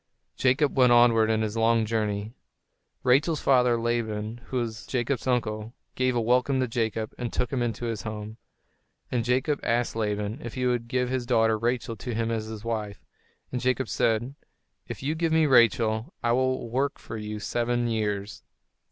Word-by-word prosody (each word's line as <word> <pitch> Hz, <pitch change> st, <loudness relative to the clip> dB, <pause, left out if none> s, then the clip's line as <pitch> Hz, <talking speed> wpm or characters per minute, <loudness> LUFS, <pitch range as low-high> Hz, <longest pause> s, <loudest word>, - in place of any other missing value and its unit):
[Illustration: 130 Hz, -, +2 dB
Jacob 145 Hz, 0 st, 0 dB
went 125 Hz, -1 st, +6 dB
onward 115 Hz, -2 st, +5 dB
in 110 Hz, 0 st, +1 dB
his 110 Hz, 0 st, -3 dB
long 115 Hz, 0 st, +3 dB
journey] 105 Hz, -1 st, -2 dB, 0.7 s
Rachel's 145 Hz, +5 st, +3 dB
father, 125 Hz, -3 st, +3 dB
Laban, 115 Hz, -1 st, -2 dB
who 130 Hz, -, -4 dB
was 115 Hz, -2 st, -4 dB
Jacob's 125 Hz, 0 st, -1 dB
uncle, 110 Hz, -2 st, -1 dB, 0.2 s
gave 130 Hz, -1 st, +1 dB
a -, -, +2 dB
welcome 125 Hz, +3 st, +2 dB
to 130 Hz, -, +1 dB
Jacob, 110 Hz, -1 st, -2 dB
and 120 Hz, -2 st, -3 dB
took 125 Hz, -, -2 dB
him 130 Hz, -, 0 dB
into 120 Hz, 0 st, -2 dB
his 115 Hz, -3 st, -3 dB
home. 110 Hz, 0 st, -6 dB, 0.7 s
And 120 Hz, -2 st, 0 dB
Jacob 130 Hz, +5 st, +1 dB
asked 120 Hz, 0 st, 0 dB
Laban 105 Hz, +3 st, -2 dB
if 120 Hz, -, -7 dB
he 125 Hz, -1 st, -1 dB
would 120 Hz, -2 st, 0 dB
give 125 Hz, +1 st, 0 dB
his 125 Hz, -2 st, -2 dB
daughter, 115 Hz, -2 st, +3 dB
Rachel, 115 Hz, +1 st, -1 dB
to 120 Hz, +2 st, -5 dB
him 115 Hz, 0 st, -1 dB
as 110 Hz, -1 st, -2 dB
his 110 Hz, -1 st, -7 dB
wife; 105 Hz, -4 st, -4 dB, 0.5 s
and 125 Hz, -, -2 dB
Jacob 130 Hz, +1 st, 0 dB
said, 115 Hz, +3 st, 0 dB, 0.5 s
"If -, -, -7 dB
you 145 Hz, +3 st, 0 dB
give 165 Hz, 0 st, -1 dB
me 160 Hz, 0 st, +4 dB
Rachel, 115 Hz, -3 st, +3 dB
I 120 Hz, -, +2 dB
will 130 Hz, 0 st, +1 dB
work 135 Hz, +4 st, -1 dB
for -, -, -8 dB
you 105 Hz, -1 st, -5 dB
seven 120 Hz, +2 st, -1 dB
years." 105 Hz, -3 st, -2 dB
120 Hz, 180 wpm, -26 LUFS, 110-125 Hz, 0.7 s, went